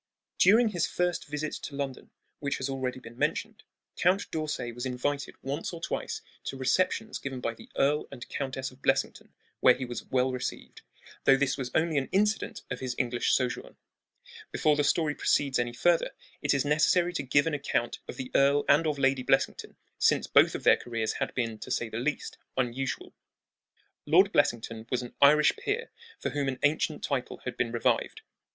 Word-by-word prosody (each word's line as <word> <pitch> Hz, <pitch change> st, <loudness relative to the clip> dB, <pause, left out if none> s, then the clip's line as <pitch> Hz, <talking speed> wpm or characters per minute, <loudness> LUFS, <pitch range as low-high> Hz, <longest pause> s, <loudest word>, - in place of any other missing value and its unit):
During 220 Hz, +5 st, +6 dB
his 175 Hz, -5 st, 0 dB
firsts 180 Hz, -1 st, -1 dB
visit 150 Hz, +1 st, -4 dB
to 140 Hz, -, -7 dB
London, 140 Hz, -2 st, -5 dB, 0.3 s
which 140 Hz, -1 st, -2 dB
has 130 Hz, +1 st, -3 dB
already 130 Hz, -1 st, -3 dB
been 120 Hz, -1 st, -13 dB
mentioned, -, -, -1 dB, 0.3 s
Count 190 Hz, +3 st, +1 dB
d'Orsay 150 Hz, -6 st, -3 dB
was 120 Hz, +1 st, -7 dB
invited 135 Hz, +2 st, -2 dB
once 140 Hz, +6 st, -3 dB
or 170 Hz, -, -6 dB
twice -, -, -3 dB, 0.2 s
to 135 Hz, -, -4 dB
receptions 185 Hz, -, 0 dB
given 135 Hz, -2 st, -5 dB
by 115 Hz, -2 st, -2 dB
the -, -, -15 dB
Earl 145 Hz, +2 st, +2 dB
and 125 Hz, -3 st, -9 dB
Countess 130 Hz, -1 st, -4 dB
of 130 Hz, +1 st, -19 dB
Blessington, -, -, 0 dB, 0.3 s
where 125 Hz, -, +6 dB
he 130 Hz, -, -4 dB
was 120 Hz, -1 st, -6 dB
well 130 Hz, 0 st, +1 dB
received, 125 Hz, -1 st, -5 dB, 0.4 s
though 135 Hz, -, +7 dB
this 135 Hz, -1 st, +1 dB
was 130 Hz, -2 st, -4 dB
only 160 Hz, -2 st, +2 dB
an 135 Hz, -, -5 dB
incident 210 Hz, +2 st, 0 dB
of -, -, -3 dB
his 125 Hz, -1 st, -3 dB
English 120 Hz, -1 st, 0 dB
sojourn. 125 Hz, -2 st, -1 dB, 0.7 s
Before 150 Hz, -1 st, +2 dB
the 145 Hz, -, +1 dB
story 150 Hz, +1 st, +2 dB
proceeds 140 Hz, -2 st, +1 dB
any 120 Hz, 0 st, 0 dB
further 170 Hz, +8 st, +2 dB, 0.3 s
it 145 Hz, 0 st, +2 dB
is 140 Hz, -, +1 dB
necessary 170 Hz, +4 st, +3 dB
to -, -, -1 dB
give 140 Hz, +2 st, +3 dB
an 165 Hz, -, -1 dB
account 135 Hz, -4 st, -1 dB
of -, -, -7 dB
the 130 Hz, -1 st, -6 dB
Earl 140 Hz, +1 st, +4 dB
and 160 Hz, +3 st, +4 dB
of 150 Hz, -2 st, 0 dB
Lady 135 Hz, -1 st, +2 dB
Blessington, -, -, 0 dB, 0.2 s
since -, -, +3 dB
both -, -, +5 dB
of -, -, -5 dB
their -, -, +6 dB
careers 115 Hz, -2 st, -2 dB
had -, -, -2 dB
been, 115 Hz, -3 st, -2 dB
to -, -, -8 dB
say 115 Hz, -, -1 dB
the 110 Hz, -, -4 dB
least, 145 Hz, +4 st, -3 dB, 0.2 s
unusual. 130 Hz, +1 st, -2 dB, 0.9 s
Lord -, -, +5 dB
Blessington 115 Hz, -1 st, 0 dB
was 125 Hz, -1 st, -1 dB
an 120 Hz, -, -9 dB
Irish 150 Hz, +2 st, +6 dB
peer 470 Hz, 0 st, -3 dB, 0.3 s
for -, -, -3 dB
whom 145 Hz, -1 st, -1 dB
an 130 Hz, -1 st, -2 dB
ancient 150 Hz, +1 st, +1 dB
title 130 Hz, -3 st, -2 dB
had 125 Hz, -2 st, -4 dB
been 120 Hz, -2 st, -1 dB
revived. 120 Hz, -1 st, 0 dB
135 Hz, 185 wpm, -29 LUFS, 125-150 Hz, 0.9 s, though